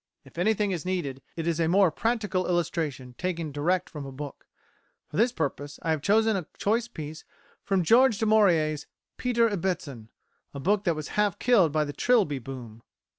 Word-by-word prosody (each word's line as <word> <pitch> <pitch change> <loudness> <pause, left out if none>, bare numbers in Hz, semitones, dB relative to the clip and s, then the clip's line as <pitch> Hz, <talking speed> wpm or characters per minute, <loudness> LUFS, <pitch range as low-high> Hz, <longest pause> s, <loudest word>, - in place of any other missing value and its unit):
If 135 +5 -11
anything 210 +1 +2
is 175 -5 -3
needed 165 -8 -3
it 165 - -4
is 170 -1 0
a 165 - +2
more 185 0 +4
practical 210 -2 -1
illustration 160 -7 -2
taken 170 -4 -2
direct 165 +6 0
from 150 -2 -8
a 135 - -7
book. 140 +1 -8 0.6
For - - -5
this 235 +4 +4
purpose 145 - -3
I 165 - 0
have 155 -2 0
chosen 220 +4 +3
a 180 -5 -3
choice 225 +3 +1
piece 155 -8 -8 0.4
from 195 -2 +1
George 235 +4 +5
Du 220 - 0
Maurier's 170 -9 +3 0.3
"Peter 235 -2 +2
Ibbetson," 170 - -3 0.5
a - - -4
book 200 +7 +1
that 170 -3 +2
was 155 -1 -6
half 210 -3 +1
killed 210 -11 +4
by 155 0 +1
the 145 - -6
Trilby 205 - +2
boom. 120 -3 -9
175 Hz, 180 wpm, -27 LUFS, 150-210 Hz, 0.6 s, George